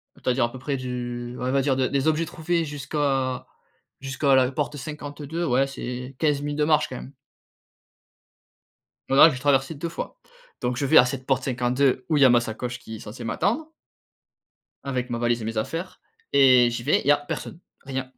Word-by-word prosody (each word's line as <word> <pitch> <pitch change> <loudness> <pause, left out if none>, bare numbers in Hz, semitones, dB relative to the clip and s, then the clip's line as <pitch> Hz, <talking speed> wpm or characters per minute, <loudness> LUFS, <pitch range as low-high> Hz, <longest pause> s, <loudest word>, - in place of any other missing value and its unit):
c'est-à-dire, 125 -1 +1
à 120 - -5
peu 130 - -9
près, 140 +1 -2
du 120 -1 -5
ouais, 125 +1 -2
on - - 0
va 135 0 +2
dire, 135 -1 +1
de 130 -1 +1
des 140 +2 0
objets 160 +1 +2
trouvés 165 +1 -1
jusqu'à 135 -2 -1 0.5
jusqu'à 135 +1 +1
la 130 0 +3
porte 145 +1 -3
52, 150 +3 -5
ouais, 135 +1 +2
c'est 125 0 -6
15 150 -3 +1
minutes 145 +1 -3
de - - +3
marche, 155 -1 +3
quand 130 - -6
même. 135 - -10 2.0
Voilà, 140 +4 +7
j'ai 125 - -5
traversé 135 +2 +2
2 165 +4 -4
fois, 335 - -7 0.4
donc 125 0 -1
je 140 - -1
vais 155 - +7
à 125 - +8
cette 130 0 -4
porte 130 -1 +1
52 130 +1 +1
où 155 - +2
il - - +3
y - - +9
a 130 - +7
ma 120 -1 +5
sacoche 120 +2 -5
qui 110 -2 -9
est - - -10
censée 115 +3 -9
m'attendre 235 - -1 1.1
avec 125 -3 -3
ma 120 - -2
valise 120 -1 0
et - - -5
mes 115 0 -3
affaires, 165 +11 -4 0.3
et 130 -3 +6
j'y 120 0 -4
vais. - - +2
Il - - -11
y - - +5
a 145 - +7
personne, 145 +3 -6 0.2
rien. 130 -1 -4
135 Hz, 205 wpm, -24 LUFS, 125-145 Hz, 2.0 s, y